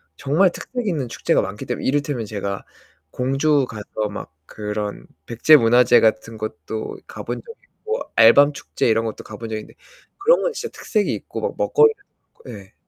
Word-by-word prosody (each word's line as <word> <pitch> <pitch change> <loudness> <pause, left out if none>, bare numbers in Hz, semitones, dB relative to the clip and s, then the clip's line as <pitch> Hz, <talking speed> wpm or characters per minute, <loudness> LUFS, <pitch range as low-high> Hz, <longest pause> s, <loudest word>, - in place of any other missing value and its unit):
정말 165 - +2
특색 245 +2 -5
있는 145 -9 -1
축제가 - - +1
많기 95 +2 -6
때문에 125 - -4
이를테면 140 -4 -1
제가 100 -2 -4 0.5
공주가서 130 -6 0
막 100 - -8
그런 105 -1 -5 0.2
백제 120 - +5
문화재 120 0 +5
같은 110 0 +1
것도 110 0 -6
가본 - - -6
적이 460 +1 -12 0.2
있고 445 +3 -3 0.2
알밤 140 +6 +7
축제 - - -2
이런 115 0 +2
것도 110 - -5
가본 110 +1 -8
적이 110 -1 -3
있는데 - - -16 0.4
그런 475 +6 +4
건 - - 0
진짜 465 - -5
특색이 210 -2 0
있고 - - -7
뭐 - - -3
먹거리 450 -1 +4 0.5
네. - - -11
120 Hz, 335 characters per minute, -21 LUFS, 110-155 Hz, 0.5 s, 알밤